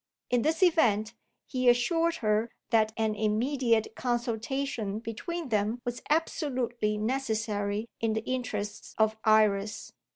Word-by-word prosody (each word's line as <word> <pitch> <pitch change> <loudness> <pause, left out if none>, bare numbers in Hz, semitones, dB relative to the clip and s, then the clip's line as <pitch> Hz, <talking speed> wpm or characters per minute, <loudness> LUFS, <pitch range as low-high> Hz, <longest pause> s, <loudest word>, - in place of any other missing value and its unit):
In 245 -1 +3
this 320 +7 +1
event, 230 - +3 0.3
he 255 -1 +2
assured 330 +8 +2
her 215 +2 +2 0.2
that 220 -2 +4
an 220 -1 +1
immediate 225 +2 +1
consultation 240 -2 -2
between 265 +8 -5
them 215 +2 0
was 245 0 -3
absolutely 250 -8 0
necessary 215 -3 -1
in 225 -1 +1
the 220 0 -2
interests 210 -5 -4
of 220 0 +3
Iris. 215 -1 +2
225 Hz, 120 wpm, -29 LUFS, 215-255 Hz, 0.3 s, that